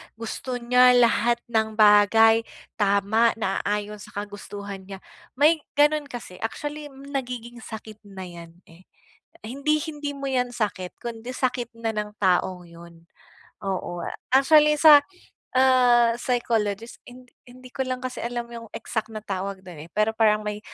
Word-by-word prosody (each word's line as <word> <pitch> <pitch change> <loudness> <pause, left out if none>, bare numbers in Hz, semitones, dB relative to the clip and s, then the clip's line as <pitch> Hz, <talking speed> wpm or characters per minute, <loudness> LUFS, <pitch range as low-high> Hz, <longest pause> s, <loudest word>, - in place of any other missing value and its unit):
gusto 230 +3 -5
niya 250 +1 +5
lahat 235 0 +4 0.2
ng 220 -1 0
bagay 225 +2 +5 0.3
tama, 205 +3 +2
naaayon 210 0 -2
sa - - -13
kagustuhan 200 -1 -9
niya. 195 -1 -9 0.3
May 310 +4 +4 0.2
gano'n 295 0 +3
kasi 235 -9 -9
actually 295 +6 -5
nagiging 250 -3 -6
sakit 220 -2 -10
na 195 -1 -9
'yan, 170 -2 -11 0.2
eh, 175 +3 -19 0.5
hindi 280 +7 -1
hindi 295 -2 -5
mo 275 -1 -5
'yan 250 -1 -1
sakit 185 -5 -3
kundi 235 +1 -6
sakit 245 -2 -2
na 230 0 -4
ng 210 -1 -4
taong 180 -2 +1
yun. 170 0 -15 0.5
Oo 185 -3 -4 0.2
actually 300 +3 +5
sa, 295 -2 +8 0.5
ah, 250 -2 +5
psychologist 230 -3 -1
hin 250 +1 -13 0.2
hindi 255 +1 -14
ko 265 0 -3
lang 255 0 -4
kasi 255 0 -5
alam 240 0 -4
yung 230 -1 -8
exact 220 -1 -3
na 215 -2 -8
tawag 195 -1 -5
do'n, 165 -4 -10
eh, - - -31
pero 215 +1 +2
parang 215 -1 +2
may 210 0 -4
225 Hz, 145 wpm, -24 LUFS, 205-255 Hz, 0.5 s, sa